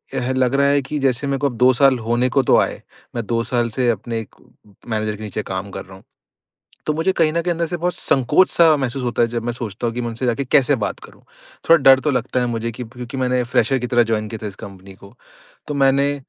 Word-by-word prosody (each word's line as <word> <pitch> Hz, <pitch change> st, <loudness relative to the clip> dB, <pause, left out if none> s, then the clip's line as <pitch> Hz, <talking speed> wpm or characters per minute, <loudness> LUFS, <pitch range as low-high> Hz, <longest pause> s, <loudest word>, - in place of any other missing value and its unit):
ह 125 Hz, +1 st, -1 dB
लग 130 Hz, 0 st, +1 dB
रहा 140 Hz, 0 st, +3 dB
है 140 Hz, 0 st, +3 dB
कि 140 Hz, +3 st, -5 dB
जैसे 135 Hz, 0 st, 0 dB
मेरे 140 Hz, 0 st, 0 dB
को 145 Hz, -, +1 dB
अब 120 Hz, -, -9 dB
2 125 Hz, +1 st, +5 dB
साल 135 Hz, 0 st, +4 dB
होने 120 Hz, +2 st, 0 dB
को 135 Hz, +2 st, +2 dB
तो -, -, +6 dB
आए, -, -, -3 dB, 0.3 s
मैं 120 Hz, -2 st, -3 dB
2 115 Hz, +1 st, -1 dB
साल 120 Hz, -1 st, -1 dB
से 120 Hz, +2 st, 0 dB
अपने 115 Hz, +1 st, -2 dB
एक 110 Hz, -, -10 dB, 0.5 s
मैनेजर 110 Hz, -2 st, -2 dB
के 110 Hz, -, -10 dB
नीचे 105 Hz, 0 st, -4 dB
काम 95 Hz, +1 st, -5 dB
कर -, -, -7 dB
रहा 95 Hz, -, -14 dB
हूँ, 95 Hz, -, -16 dB, 0.8 s
तो 155 Hz, -, 0 dB
मुझे 160 Hz, +5 st, +1 dB
कहीं 160 Hz, -3 st, +2 dB
न 170 Hz, -, 0 dB
कहीं 175 Hz, 0 st, -1 dB
अंदर 170 Hz, 0 st, -1 dB
से 175 Hz, -, -4 dB
बहुत 175 Hz, +1 st, -2 dB
संकोच 135 Hz, +8 st, +2 dB
सा 165 Hz, -2 st, +5 dB
महसूस 135 Hz, -1 st, -3 dB
होता 120 Hz, -1 st, -1 dB
है 120 Hz, -, +4 dB
जब 115 Hz, 0 st, -4 dB
मैं 120 Hz, 0 st, -2 dB
सोचता 120 Hz, 0 st, -5 dB
हूँ 115 Hz, -, -3 dB
कि 125 Hz, -, -2 dB
मैं 120 Hz, -, -3 dB
उनसे 115 Hz, +3 st, -4 dB
जाके 125 Hz, +3 st, -1 dB
कैसे 140 Hz, +2 st, +3 dB
बात -, -, -5 dB
करूँ? -, -, -16 dB, 0.5 s
थोड़ा 165 Hz, -, +8 dB
डर 135 Hz, -1 st, +7 dB
तो 150 Hz, +2 st, 0 dB
लगता 125 Hz, 0 st, -1 dB
है 125 Hz, -, 0 dB
मुझे 115 Hz, 0 st, -3 dB
कि 120 Hz, +2 st, -7 dB
क्योंकि 125 Hz, +2 st, -9 dB
मैंने 125 Hz, -1 st, +1 dB
फ्रेशर 135 Hz, +2 st, +1 dB
की 125 Hz, -, -3 dB
तरह 120 Hz, -1 st, +3 dB
जॉइन 110 Hz, -2 st, -1 dB
किया 110 Hz, 0 st, -8 dB
था -, -, -3 dB
इस 100 Hz, -, -9 dB
कंपनी 95 Hz, -1 st, -11 dB
को, 100 Hz, +1 st, -16 dB, 0.5 s
तो 150 Hz, -, -3 dB
मैंने 140 Hz, +1 st, +2 dB
125 Hz, 265 wpm, -20 LUFS, 115-140 Hz, 0.8 s, थोड़ा